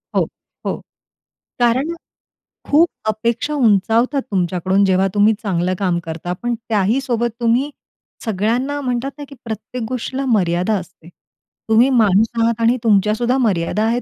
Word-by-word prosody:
हो, - - +2 0.4
हो. - - -1 0.8
कारण 255 +7 +2 0.8
खूप 325 +4 +5 0.2
अपेक्षा 235 +7 -1
उंचावतात 235 +3 +2
तुमच्याकडून, 185 +1 +1
जेव्हा 190 0 +3
तुम्ही 210 +2 +4
चांगलं 185 -2 0
काम 180 -3 +1
करता. 165 +2 -4
पण 240 +6 -3 0.2
त्याहीसोबत 235 +3 +1
तुम्ही 240 +5 +2 0.6
सगळ्यांना 235 +7 0
म्हणतात 255 +1 -2
ना, 290 - -7
की 280 - -11
प्रत्येक 220 +2 -5
गोष्टीला 255 +2 -3
मर्यादा 185 -4 +1
असते. 175 -2 -14 0.6
तुम्ही 230 +4 +5
माणूस 220 -4 +4
आहात 230 0 +1
आणि 235 +2 +3
तुमच्यासुद्धा 220 +4 +2
मर्यादा 210 -3 +1
आहेत. 235 +2 +1
225 Hz, 130 wpm, -19 LUFS, 195-250 Hz, 0.8 s, खूप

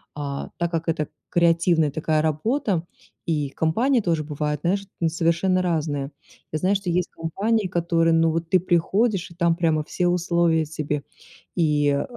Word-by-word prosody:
а, 140 -1 -4
так 170 0 -1
как 165 0 -2
это 155 -2 0 0.2
креативная 170 -2 +3
такая 155 +1 0
работа, 185 - 0 0.4
и 150 -4 -1
компании 230 - +1
тоже 165 -5 0
бывают, 150 -1 -3
знаешь, 195 +3 0
ну 165 - +2
совершенно 170 +3 +1
разные. 155 -5 -1 0.4
Я 155 - -2
знаю, 190 +2 +2
что 195 -2 -2
есть 180 +1 0
компании, 200 +6 -1
которые, 170 -2 +1
ну 165 0 +3
вот 165 0 -3
ты 185 - +4
приходишь, 185 +3 +1
и - - -14
там 170 -1 +2
прямо 160 -3 +1
все 180 +3 -1
условия 170 -2 +2
тебе. 150 -2 -3 0.5
И, 150 -4 +2
э, 140 0 +1
165 Hz, 165 wpm, -23 LUFS, 155-180 Hz, 0.5 s, ты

